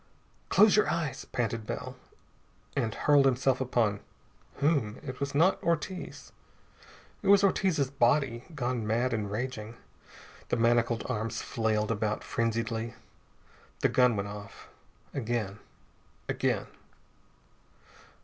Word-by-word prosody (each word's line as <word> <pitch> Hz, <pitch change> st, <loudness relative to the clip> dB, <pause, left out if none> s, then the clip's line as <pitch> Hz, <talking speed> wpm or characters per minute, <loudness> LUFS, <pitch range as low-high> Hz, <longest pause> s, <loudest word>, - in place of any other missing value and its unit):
"Close 215 Hz, -2 st, +6 dB
your 210 Hz, -, +3 dB
eyes!" 150 Hz, -6 st, -2 dB
panted 115 Hz, -2 st, -2 dB
Bell, -, -, -5 dB, 0.8 s
and 115 Hz, -5 st, 0 dB
hurled 145 Hz, -2 st, +4 dB
himself 130 Hz, 0 st, +2 dB
upon 115 Hz, -5 st, +1 dB, 0.6 s
whom? 140 Hz, -8 st, +1 dB
It 130 Hz, -3 st, -6 dB
was 140 Hz, 0 st, -3 dB
not 170 Hz, +6 st, +4 dB
Ortiz. 170 Hz, +2 st, -3 dB, 0.9 s
It -, -, -4 dB
was 200 Hz, 0 st, +7 dB
Ortiz's 180 Hz, -8 st, +2 dB
body, 125 Hz, -2 st, +2 dB
gone 120 Hz, -5 st, -2 dB
mad 120 Hz, +3 st, +1 dB
and 105 Hz, -3 st, -2 dB
raging. 115 Hz, 0 st, -4 dB, 0.7 s
The -, -, +1 dB
manacled 115 Hz, 0 st, +2 dB
arms 115 Hz, -2 st, -2 dB
flailed 110 Hz, -1 st, 0 dB
about 105 Hz, -1 st, -1 dB
frenziedly. 115 Hz, 0 st, -2 dB, 0.9 s
The -, -, +4 dB
gun 125 Hz, -2 st, +4 dB
went 100 Hz, 0 st, -2 dB
off. 105 Hz, 0 st, -10 dB, 0.4 s
Again. 115 Hz, -5 st, -2 dB, 0.7 s
Again.... -, -, 0 dB
120 Hz, 110 wpm, -29 LUFS, 110-140 Hz, 0.9 s, was